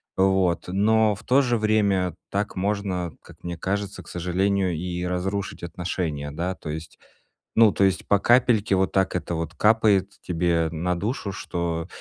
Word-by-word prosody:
Вот, 95 -2 +2
но 105 +3 +3
в 100 - -14
то 135 +3 +4
же 120 -3 +1
время 100 -4 +2 0.2
так 100 +1 -2
можно, 95 -3 -1
как - - -17
мне 85 -1 -5
кажется, 100 +2 -3
к - - -20
сожалению, 95 +2 0
и 90 +2 -3
разрушить 95 +2 -3
отношения. 85 -4 -3
Да? 85 +5 -2
То 85 - -9
есть, 80 +1 -7 0.6
ну, 110 -2 +6
то 100 - +2
есть 95 -1 0
по 100 - +4
капельке 120 -3 +3
вот, 95 0 +1
так 95 -1 +1
это 85 -1 -2
вот 80 0 -4
капает 105 -3 +3
тебе 85 -1 +1
на 90 +3 -1
душу, 105 +1 -2
что 85 -3 -3
95 Hz, 165 wpm, -24 LUFS, 85-100 Hz, 0.6 s, ну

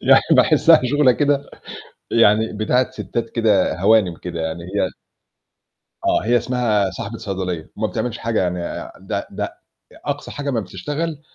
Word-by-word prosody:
يعني - - +6
باحسها - - +6
شغلة 135 0 +4
كده 145 +1 0 0.6
يعني 110 -1 +4
بتاعة 125 +4 +1
ستّات 115 -1 -4
كده 105 -6 +1
هوانم 95 -4 +3
كده 85 -2 -5
يعني، 80 +1 -4
هي 95 +1 -1 1.2
آه، - - +2
هي 120 +2 +3
اسمها 115 -5 +1
صاحبة 115 +3 -6
صيدلية، 95 -6 -4
وما 110 +1 0
بتعملش 115 +1 -3
حاجة 115 -3 0
يعني 90 0 -1
آآ، - - -6
ده - - -4
ده - - -4 0.5
أقصى - - -4
حاجة 145 0 -4
امّا 120 -4 0
بتشتغل، 145 - -4
110 Hz, 150 wpm, -20 LUFS, 95-125 Hz, 1.2 s, يعني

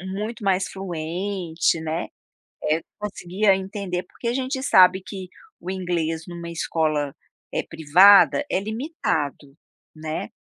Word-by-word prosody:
muito 210 +5 -5
mais 190 0 +2
fluente, 175 -1 -2
né, 160 +2 -3 0.6
eh, 155 +2 +1 0.2
conseguia 200 0 +1
entender, 190 -2 -4
porque 235 - -8
a 235 - +1
gente 260 0 -2
sabe 185 -5 +6
que 190 -2 -7 0.3
o 180 - -7
inglês 170 -4 -2
numa 170 -1 -7
escola, 155 -4 -1 0.4
eh, - - 0
privada 190 - +6
é - - +1
limitado, 210 - -3 0.4
né, 155 0 -5
185 Hz, 120 wpm, -23 LUFS, 160-200 Hz, 0.6 s, sabe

